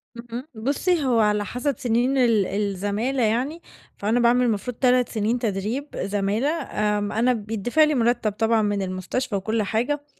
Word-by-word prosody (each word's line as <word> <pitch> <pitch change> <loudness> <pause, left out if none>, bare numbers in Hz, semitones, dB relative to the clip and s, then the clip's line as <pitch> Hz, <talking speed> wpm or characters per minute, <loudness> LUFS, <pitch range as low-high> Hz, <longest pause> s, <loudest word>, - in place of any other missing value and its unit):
اهم، 240 +3 -7
بُصّي 285 +8 0
هو 245 -3 +2
على 210 -1 +2
حسب 250 +7 -2
سنين 250 +1 +1
ال 230 -6 +3
الزمالة 205 +6 -1
يعني، 255 +9 0 0.4
فأنا 220 +4 +1
باعمل 245 +1 +4
المفروض 230 +1 -2
3 250 -2 +3
سنين 225 +2 -1
تدريب 225 +6 -2
زمالة، 205 +7 0
آمم 210 -10 -1
أنا 240 +3 +2
بيتدفع 225 +6 +1
لي 305 -1 +2
مرتب 235 -3 +1
طبعًا 225 +2 +1
من 205 -1 0
المستشفى 190 +6 -3
وكل 220 +3 -1
حاجة، 255 +8 -1
230 Hz, 155 wpm, -23 LUFS, 210-250 Hz, 0.4 s, باعمل